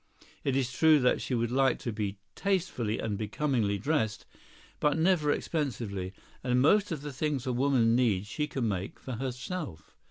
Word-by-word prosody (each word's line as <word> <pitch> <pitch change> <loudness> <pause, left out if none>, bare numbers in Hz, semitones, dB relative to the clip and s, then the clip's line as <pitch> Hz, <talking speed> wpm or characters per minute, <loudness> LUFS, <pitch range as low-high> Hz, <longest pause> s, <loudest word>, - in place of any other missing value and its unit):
It 135 -2 +1
is 130 -3 0
true 155 +2 +5
that 125 - +3
she 130 - -1
would 120 0 0
like 135 0 +3
to 125 -5 -4
be 105 -2 -3 0.2
tastefully 180 - -1
and 105 -2 -2
becomingly 110 -2 0
dressed, 110 -1 -1 0.5
but 150 +1 +2
never 160 -3 +3
expensively; 115 - -2 0.3
and 125 -1 +2
most 195 +10 +4
of 150 -4 -3
the 145 -2 -5
things 145 -1 -1
a 130 - 0
woman 120 -3 +3
needs 110 -6 +2
she 150 +8 -2
can 130 -5 -2
make 95 -2 -3
for 130 -4 -6
herself. 130 - -5
130 Hz, 170 wpm, -30 LUFS, 110-150 Hz, 0.5 s, true